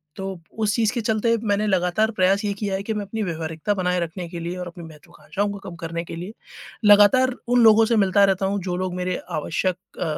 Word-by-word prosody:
तो, 190 -2 -6 0.2
उस 210 -2 +1
चीज़ 230 0 +1
के 240 - -2
चलते 225 +1 +1
मैंने 205 +1 +1
लगातार 190 +3 +1
प्रयास 195 +3 +3
ये 200 - 0
किया 200 -1 -3
है 195 - -4
कि 220 - -2
मैं 210 -1 -3
अपनी 220 +3 -5
व्यावहारिकता 165 +2 -3
बनाए 180 -2 0
रखने 170 +1 -4
के 170 -1 -6
लिए 170 +2 -4
और 180 -1 -5
अपनी 170 0 -10
महत्त्वाकांक्षाओं 160 +6 -5
को 200 - -7
कम 175 - -9
करने 170 -1 -5
के 165 - -8
लिए, 180 +6 -7 0.5
लगातार 210 +6 +6
उन 245 0 +3
लोगों 225 0 +7
से 230 0 +1
मिलता 200 -1 +4
रहता 195 0 +1
हूँ 200 +1 0
जो 180 -1 -2
लोग 185 -1 -2
मेरे 180 0 -2 0.2
आवश्यक 180 +4 -1 0.2
अ - - -1
195 Hz, 230 wpm, -23 LUFS, 180-210 Hz, 0.5 s, लोगों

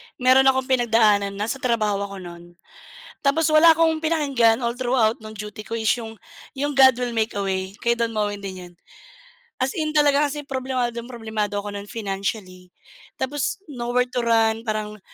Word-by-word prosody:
meron 260 +1 +4
akong 265 0 +3
pinagdaanan, 225 -6 +2
nasa 215 +6 -3
trabaho 220 -5 0
ako 195 -2 -9
nun 175 0 -12 0.7
tapos 300 +3 +2
wala 320 +1 +7
akong 320 -1 +2
pinakinggan 280 -8 +2
all 235 - 0
throughout 240 -3 +1
ng 215 0 -10
duty 210 +1 -7
ko 230 +2 -5
is 220 -1 0
yung 225 -1 -9 0.4
yung 290 +2 -1
"God 265 -3 +6
Will 245 -1 -3
Make 220 -2 -1
a 200 - -1
Way" 190 +1 -3
kay 235 - +1
Don 235 -1 -1
Moen 205 -2 -2
din 190 -2 -6
yun. - - -22 0.9
As 260 +1 0
in 310 -1 -2
talaga 290 0 +4
kasi 295 +1 -6
problemadong 255 -3 -3
problemado 220 -4 -3
ako 205 0 -4
nun 200 0 -7
financially 195 -3 -5 0.5
tapos 285 +6 -2
no 245 -7 -5
where 250 - +4
to 245 - 0
run, 225 -1 +2
parang 215 -2 -4
230 Hz, 175 wpm, -23 LUFS, 210-265 Hz, 0.9 s, wala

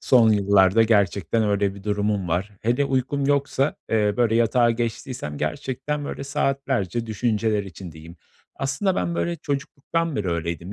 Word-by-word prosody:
Son 115 -4 +5
yıllarda 100 +1 +4
gerçekten 100 -1 +2
öyle 100 -1 +1
bir 100 - -11
durumum 105 -3 -1
var. 90 +5 -1
Hele 120 +5 +2
uykum 135 +1 -1
yoksa, 140 0 +1
eee, 105 -2 +2
böyle, 120 -2 +2
yatağa 120 +1 +3
geçtiysem 115 - -4
gerçekten, 135 - -3
böyle, 140 - -5
saatlerce 135 -6 -1
düşünceler 110 -1 0
içindeyim. 85 -2 -10 0.4
Aslında 180 +8 0
ben, 170 - -1
böyle, 170 0 -1
çocukluktan 145 +2 -3
beri 100 -4 -1
öyleydim. 85 +2 -3
115 Hz, 140 wpm, -23 LUFS, 100-135 Hz, 0.4 s, Son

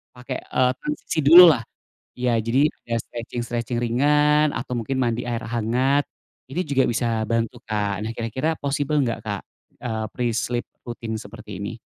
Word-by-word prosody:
pakai, 125 0 -5
eee, 125 0 +1
transisi 300 - -3
dululah. 165 -4 +9 0.6
Iya, 125 -2 +1
jadi 130 +6 +3 0.2
ada 115 -1 -2
stretching-stretching 120 0 -4
ringan 150 +5 +3
atau 125 - -4
mungkin 125 +4 -2
mandi 120 -1 0
air 115 0 -2
hangat, 125 +5 +1 0.5
ini 175 - -1
juga 135 -1 +3
bisa 115 -1 0
bantu, 115 +1 -1
Kak. 105 -2 -2
Nah, 110 - -3
kira-kira 120 +7 -2
possible 145 +1 -1
nggak 115 -3 -1
Kak, 100 -2 -3 0.4
eee, 110 -2 -2
pre-sleep 120 0 -1 0.2
rutin 115 -2 -5
seperti 105 -4 -9
ini? 105 +3 -5
120 Hz, 145 wpm, -23 LUFS, 115-135 Hz, 0.6 s, dululah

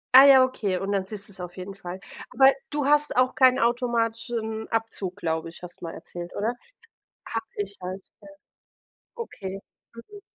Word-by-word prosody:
Ah 265 +1 +12
ja, 265 -2 +9
okay 210 -7 -1
und 195 +2 -3
dann 195 -2 0
siehst 205 -1 -7
du's 195 -2 -13
auf 180 0 -7
jeden 185 +2 -6
Fall. 185 -1 -7 0.3
Aber 270 +2 +6 0.2
du 295 -2 -1
hast 295 +1 +3
auch 255 0 +3
keinen 255 -1 +5
automatischen 230 -2 0
Abzug, 225 -5 -2
glaube 165 -4 -2
ich, 170 - -14
hast 180 - -10
mal 165 - -5
erzählt, 175 +1 -8
oder? 220 +4 0 0.7
Habe 225 0 -3
ich 200 -1 -3
halt. 185 +1 -5 0.2
Ja. - - -14 0.9
Okay. 195 - -6 0.3
Mhm. 405 - -12
220 Hz, 170 wpm, -26 LUFS, 190-255 Hz, 0.9 s, Ah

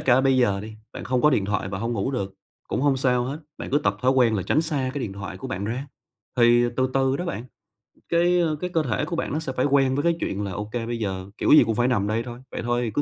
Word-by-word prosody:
cả 130 0 +4
bây 135 -1 +3
giờ 100 -6 +2
đi, 110 +1 -8 0.2
bạn - - -7
không 125 -1 0
có 150 - +6
điện 105 -7 +2
thoại 100 -1 -1
và 95 - -4
hông 115 +4 -2
ngủ 125 +3 -1
được, 100 -7 -3 0.3
cũng - - -1
hông 140 -2 +3
sao 125 -2 +2
hết, 140 +4 -5 0.2
bạn - - -6
cứ 145 - +3
tập 100 -6 0
thói 130 - +4
quen 120 -4 +3
là 95 - 0
tránh 155 - +2
xa 145 -5 -1
cái 145 - -2
điện 100 - -4
thoại 100 0 -7
của 135 - -6
bạn 100 -3 -3
ra. 125 +6 -3 0.5
Thì 120 0 +5
từ 130 0 +1
từ 135 0 +2
đó 180 - -3
bạn 125 -9 -4 0.7
cái, 175 +1 +3
ơ, 160 -3 +1
cái 180 +4 -4
cơ 165 -3 +1
thể 115 -6 -1
của 175 - -4
bạn 165 - -2
nó 155 - 0
sẽ 140 -4 -4
phải 130 - +1
quen 135 -2 +3
với 145 - 0
cái 170 -1 +3
chuyện 100 +1 -2
là 100 - -3
ô 105 +3 -4
kê 120 -2 -2
bây 120 0 -3
giờ 95 -2 -3
kiểu - - +1
gì 155 - +9
cũng 110 0 -1
phải 120 +3 +2
nằm 105 -5 +1
đây 110 +2 0
thôi, 120 0 -8
vậy - - -4
thôi 120 +1 0
thì 115 - -2
cứ 125 - 0
125 Hz, 305 wpm, -24 LUFS, 110-140 Hz, 0.7 s, gì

